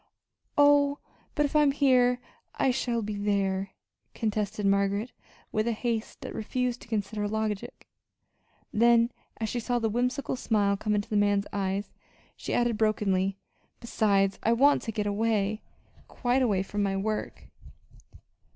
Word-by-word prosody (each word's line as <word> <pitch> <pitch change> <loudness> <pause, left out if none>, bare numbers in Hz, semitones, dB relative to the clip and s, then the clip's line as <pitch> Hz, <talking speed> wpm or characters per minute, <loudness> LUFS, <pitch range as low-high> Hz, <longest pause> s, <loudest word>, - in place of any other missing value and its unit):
"Oh, 285 0 +5 0.4
but 295 - +2
if 285 - -4
I'm 300 -1 +5
here 250 -3 +3 0.4
I 265 - +2
shall 240 -2 -1
be 210 +1 -3
there," 195 -1 -1 0.4
contested 210 -2 -2
Margaret 200 +3 +1 0.4
with 215 +1 0
a 235 - +1
haste 230 0 -3
that - - -6
refused 250 +2 -2
to - - -13
consider 210 -1 -2
logic; 215 -1 -4 0.9
then, 235 +1 +4 0.3
as 220 - -2
she 240 - -2
saw 245 +1 -1
the 225 -2 0
whimsical 250 +4 -1
smile 205 -5 +1
come 210 +1 -1
into 205 0 -1
the 210 - +2
man's 205 -1 +2
eyes, 195 0 -2 0.4
she - - -6
added 240 -2 +1
brokenly: 195 -3 +1 0.4
"Besides, 200 -4 +1
I 230 - +2
want 280 +5 +4
to 225 - -4
get 210 -1 -2
away 210 0 0 0.5
quite 250 +1 0
away 205 -7 +2
from 205 +1 -3
my 195 -1 0
work." 215 +2 -4
215 Hz, 145 wpm, -28 LUFS, 205-245 Hz, 0.9 s, Oh